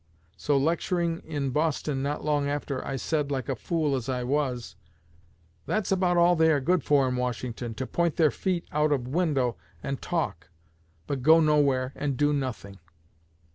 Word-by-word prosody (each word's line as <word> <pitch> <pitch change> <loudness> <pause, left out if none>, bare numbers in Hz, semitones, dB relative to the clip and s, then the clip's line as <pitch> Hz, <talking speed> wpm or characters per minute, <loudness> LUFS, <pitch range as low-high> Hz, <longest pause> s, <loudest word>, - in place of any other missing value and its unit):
'_ - - -38 0.3
So, 145 -1 +1
lecturing 170 +3 0
in 145 -4 -2
Boston 150 -1 0
not 145 +2 -3
long 145 -2 +1
after, 145 -2 -3
I 135 - -4
said, 145 +2 -1
like 130 -4 -2
a 135 - -1
fool 150 +4 -1
as 130 0 -4
I 125 -1 -1
was, 130 -2 -2 0.9
'That's 215 -3 -1
about 180 -2 +2
all 175 +1 +5
they 160 -1 +4
are 145 - +3
good 175 +6 +1
for 140 -3 +3
in 125 0 -1
Washington, 120 -1 -3
to 130 - -3
point 170 +3 0
their 155 -3 +4
feet 180 -3 -2
out 150 0 +1
o' 145 - +4
window 135 -2 0 0.3
and 135 -1 -3
talk, 105 - -3 0.6
but 140 -3 -3
go 160 +5 +6
nowhere 140 -4 +2
and 140 -3 -2
do 145 +1 +2
nothing.' 125 -8 -4
145 Hz, 175 wpm, -27 LUFS, 130-160 Hz, 0.9 s, go